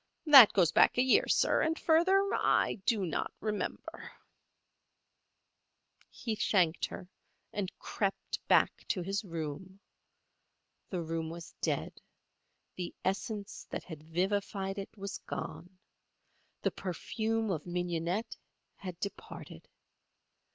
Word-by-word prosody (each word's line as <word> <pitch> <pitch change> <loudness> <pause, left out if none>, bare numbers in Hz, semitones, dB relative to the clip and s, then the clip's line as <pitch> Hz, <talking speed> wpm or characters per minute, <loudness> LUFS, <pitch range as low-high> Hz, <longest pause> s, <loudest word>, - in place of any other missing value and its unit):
That 275 -8 +10
goes 180 -5 +4
back - - +5
a 250 - +5
year, 415 - +4
sir, - - +3
and 320 +1 +1
further 375 +5 +4
I 200 - +2
do 220 -6 +2
not 165 - -2
remember." 215 -1 -4 2.0
He 230 -2 -4
thanked 180 -6 +2
her 185 - -9 0.5
and 200 -3 -2
crept 195 -2 -2
back - - +3
to 180 - -1
his 195 +3 -2
room. 170 +2 -6 1.1
The 180 -3 -2
room 160 0 -3
was 170 0 -9
dead. - - -2 0.8
The 180 -1 -5
essence 200 +1 -3
that - - -4
had 160 -4 -9
vivified 195 +4 -1
it 195 - -6
was 200 0 -5
gone. 180 +1 -6 0.9
The - - +2
perfume 220 +4 -2
of 160 -2 -3
mignonette 175 +3 -2 0.4
had 180 -3 -7
departed. 200 - -7
195 Hz, 115 wpm, -32 LUFS, 175-220 Hz, 2.0 s, That